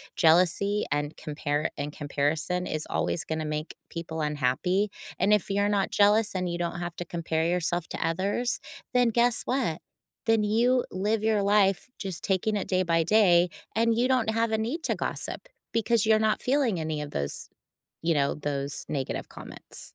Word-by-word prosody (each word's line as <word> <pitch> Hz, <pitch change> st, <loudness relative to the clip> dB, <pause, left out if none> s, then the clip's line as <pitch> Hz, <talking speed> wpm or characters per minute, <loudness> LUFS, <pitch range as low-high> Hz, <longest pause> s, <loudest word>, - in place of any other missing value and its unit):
jealousy 185 Hz, +5 st, +4 dB
and 145 Hz, +1 st, -1 dB
compare 150 Hz, 0 st, -2 dB
and 145 Hz, 0 st, -3 dB
comparison 155 Hz, +5 st, -1 dB
is 155 Hz, 0 st, -3 dB
always 175 Hz, -, -1 dB
gonna 160 Hz, -2 st, -3 dB
make 150 Hz, +1 st, -4 dB
people 165 Hz, -1 st, -5 dB
unhappy. 150 Hz, +8 st, 0 dB, 0.3 s
And 200 Hz, +3 st, +4 dB
if 210 Hz, -2 st, +1 dB
you're 200 Hz, +1 st, +1 dB
not 200 Hz, -2 st, +1 dB
jealous, 210 Hz, +1 st, +4 dB
and 180 Hz, -1 st, -1 dB
you 170 Hz, -, -2 dB
don't 175 Hz, 0 st, -3 dB
have 175 Hz, -1 st, -5 dB
to 175 Hz, -, -4 dB
compare 160 Hz, -1 st, -2 dB
yourself 175 Hz, 0 st, 0 dB
to -, -, -2 dB
others, 200 Hz, +8 st, 0 dB, 0.3 s
then 245 Hz, -1 st, +4 dB
guess 235 Hz, +1 st, +3 dB
what? 245 Hz, -, -1 dB, 0.5 s
Then 225 Hz, -2 st, +3 dB
you 240 Hz, +4 st, +2 dB
live 205 Hz, +3 st, 0 dB
your 215 Hz, -2 st, +2 dB
life 200 Hz, +2 st, +2 dB
just 190 Hz, -5 st, -4 dB
taking 200 Hz, +2 st, 0 dB
it 200 Hz, -, -2 dB
day 185 Hz, -1 st, +2 dB
by 165 Hz, -2 st, +2 dB
day, 180 Hz, -3 st, +4 dB, 0.3 s
and 230 Hz, +1 st, +3 dB
you 250 Hz, +2 st, +3 dB
don't 250 Hz, -4 st, +2 dB
have 225 Hz, 0 st, 0 dB
a 220 Hz, -, +2 dB
need 240 Hz, +10 st, -2 dB
to -, -, 0 dB
gossip, -, -, -3 dB, 0.3 s
because 230 Hz, -1 st, +2 dB
you're 215 Hz, 0 st, +4 dB
not 215 Hz, -, 0 dB
feeling 250 Hz, -, +1 dB
any 155 Hz, -1 st, -2 dB
of 145 Hz, -, -6 dB
those, 70 Hz, 0 st, -3 dB, 0.5 s
you 165 Hz, 0 st, +2 dB
know, 140 Hz, -1 st, +1 dB
those 140 Hz, -1 st, -2 dB
negative 135 Hz, -3 st, -3 dB
comments. -, -, -8 dB
185 Hz, 175 wpm, -27 LUFS, 160-215 Hz, 0.5 s, jealousy